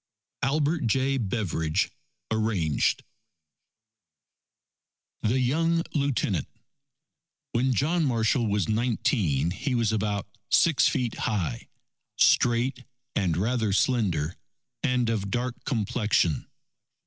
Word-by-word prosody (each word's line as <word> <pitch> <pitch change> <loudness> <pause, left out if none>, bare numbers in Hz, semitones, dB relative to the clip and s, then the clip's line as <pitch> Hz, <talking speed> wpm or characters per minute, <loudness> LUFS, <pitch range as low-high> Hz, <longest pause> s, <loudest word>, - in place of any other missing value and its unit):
Albert 150 0 +1
J. 135 +3 +1
Beveridge 95 -8 -1 0.4
(Arranged) 110 -9 +1 2.2
THE 120 +5 +1
YOUNG 165 +6 +1
LIEUTENANT 135 - 0 1.0
When 125 +2 +1
John 160 +5 +1
Marshall 115 -1 +1
was 100 -4 0
nineteen, 110 - +1
he 125 +7 -2
was 115 -2 +1
about 105 -2 -1 0.2
six 165 -5 +4
feet 125 -6 0 0.2
high, 85 - -2 0.5
straight, 125 +2 +3 0.3
and 90 -6 +1
rather 110 +2 0
slender, 95 - +1 0.4
and 125 -2 +1
of 105 -3 -1
dark 125 +2 -3
complexion. 110 - 0
115 Hz, 90 wpm, -26 LUFS, 100-130 Hz, 2.2 s, six